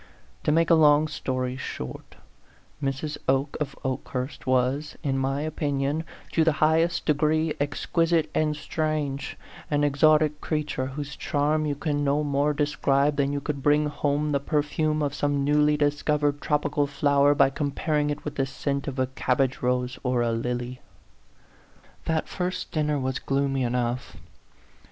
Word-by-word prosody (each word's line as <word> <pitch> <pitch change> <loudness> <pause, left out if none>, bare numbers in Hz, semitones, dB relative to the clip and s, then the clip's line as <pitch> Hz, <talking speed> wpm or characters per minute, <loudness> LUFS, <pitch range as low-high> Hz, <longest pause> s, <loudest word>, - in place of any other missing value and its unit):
To - - +3
make 165 +2 +3
a - - +8
long 150 -1 +5
story 130 -4 -3
short, 65 - -7 0.7
Mrs. 140 +2 -3
Oke 135 +2 +1
of 140 -2 -3
Okehurst 130 0 -4
was, 130 +4 +1
in 135 -2 0
my 135 +1 0
opinion, 150 0 -1 0.3
to 165 - +3
the 160 -1 +3
high 155 +2 +3
est 170 +1 -1
degree 155 +1 +2
exquisite 165 +3 +1
and 155 -1 +1
strange 150 -2 -2 0.3
an 145 -1 +1
exotic 150 +1 +3
creature, 150 -4 -2
whose 140 +1 -6
charm 150 +1 0
you 145 - -1
can 145 -1 -1
no 145 +1 +1
more 145 0 +1
de 150 0 +1
scribe 140 0 +1
than 140 -1 +1
you 145 - -1
could 140 -1 -4
bring 150 +2 +3
home 145 +1 0
the 140 - +2
per 145 +1 0
fume 155 +1 0
of 145 -1 -1
some 145 -1 0
newly 150 +1 +3
discovered 145 0 +1
tropical 145 -1 +1
flower 145 0 +3
by 135 - +4
comparing 150 +1 -1
it 145 - -4
with 150 - -3
the 135 -1 +1
scent 140 +1 -3
of 135 -1 -4
a 130 - +2
cabbage 130 0 0
rose 125 0 -1
or 125 -2 +1
a 115 - +1
lily. 125 +2 -3 1.2
That 160 -1 0
first 180 0 -3
dinner 150 -1 0
was 130 -1 -2
gloomy 135 -1 0
enough. 125 0 -2
145 Hz, 160 wpm, -26 LUFS, 135-150 Hz, 1.2 s, a